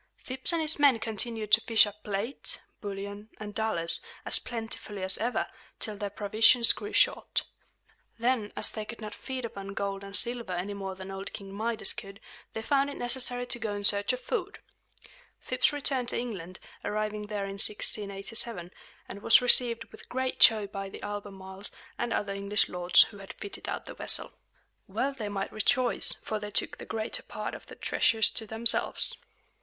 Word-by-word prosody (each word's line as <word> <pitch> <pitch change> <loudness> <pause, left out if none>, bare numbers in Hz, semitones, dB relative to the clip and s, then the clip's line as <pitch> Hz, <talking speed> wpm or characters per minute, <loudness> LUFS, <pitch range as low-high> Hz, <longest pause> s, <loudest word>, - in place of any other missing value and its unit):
Phips 260 +4 +3
and 335 -1 +1
his 310 0 +3
men 280 -4 +6
continued 220 -1 -3
to 220 +1 +7
fish 225 -1 +5
up 210 0 -9
plate, 210 +6 -3 0.2
bullion, 200 +1 -6
and 210 -1 -7
dollars, 205 -7 0 0.2
as - - +2
plentifully 225 -4 -6
as 190 0 +1
ever, 240 +3 0 0.3
till 215 -3 -3
their 205 0 -4
provisions 220 +4 +6
grew 415 - -7
short. - - +2 0.7
Then, 235 -3 0
as - - -2
they 215 - -4
could 230 +2 -9
not 215 -1 -7
feed 260 -2 -5
upon 200 -3 -7
gold 200 0 -3
and 195 0 -2
silver 235 -4 +2
any 180 +3 -3
more 195 -1 -5
than 190 +1 -8
old 195 +1 -6
King 195 -1 -8
Midas 220 +2 +1
could, 195 -3 -9 0.3
they 220 - -5
found 280 +2 +2
it 285 - -7
necessary 245 0 +1
to 245 -1 +3
go 215 -2 -2
in 205 - -5
search 200 +1 +4
of 255 - -3
food. 410 -3 -3 0.8
Phips 255 +4 +1
returned 270 -4 0
to - - 0
England, 190 -7 -5 0.3
arriving 210 0 -2
there 205 -1 -3
in 195 0 -6
1687, 200 -2 -2 0.4
and 200 - -8
was 225 - +8
received 245 -2 +4
with - - -14
great 260 +1 -2
joy 215 -2 +7
by 195 -1 -6
the - - -10
Albemarles 195 -1 -6 0.3
and 240 - -1
other 200 -1 -1
English 200 +1 +2
lords 180 0 +5
who 205 - -10
had 195 - -9
fitted 200 - -8
out - - -4
the - - -8
vessel. - - 0 0.5
Well 275 +2 -1
they 220 -6 -5
might 195 -1 -3
rejoice; 250 +3 +2
for 215 - -3
they 210 0 -6
took 200 - +3
the - - -7
greater 220 0 -3
part - - -6
of - - -10
the - - -11
treasures 220 -1 +2
to 220 - -6
themselves. 225 +2 +2
215 Hz, 180 wpm, -29 LUFS, 200-240 Hz, 0.8 s, was